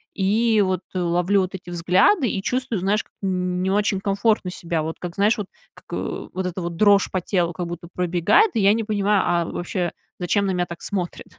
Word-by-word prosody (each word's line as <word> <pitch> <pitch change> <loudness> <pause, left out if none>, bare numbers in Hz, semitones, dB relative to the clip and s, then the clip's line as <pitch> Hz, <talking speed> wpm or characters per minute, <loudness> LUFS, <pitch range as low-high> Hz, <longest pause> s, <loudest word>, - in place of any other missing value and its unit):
И 215 +3 +2
вот 185 -2 0
ловлю 180 +2 +1
вот 185 +1 -3
эти 180 -1 -9
взгляды, 185 - +3
и 195 - -2
чувствую, 250 -3 -1
знаешь, 200 +4 +1 0.2
м, 195 - -1 0.3
н - - -1
не 190 - 0
очень 200 -1 +1
комфортно 200 0 +1
себя. 170 -3 -3
Вот 160 +1 -4
как, 175 -1 -6
знаешь, 210 +3 +3
вот, 205 -2 -4 0.3
как - - -19
вот 185 0 -4
эта 180 +1 -3
дрожь 200 +3 +4
по 185 - 0
телу 175 -1 0
как 175 +1 -4
будто 170 0 -7
пробегает, 180 - +3
и 220 - +2
я 200 +1 +6
не 225 -1 -1
понимаю, 205 -1 +2
а 170 -1 +2
вообще, 175 0 -3 0.3
зачем 200 +3 +1
на 190 - 0
меня 180 -1 0
так 170 -1 -9
смотрят? 185 -4 -3
190 Hz, 205 wpm, -22 LUFS, 175-205 Hz, 0.3 s, я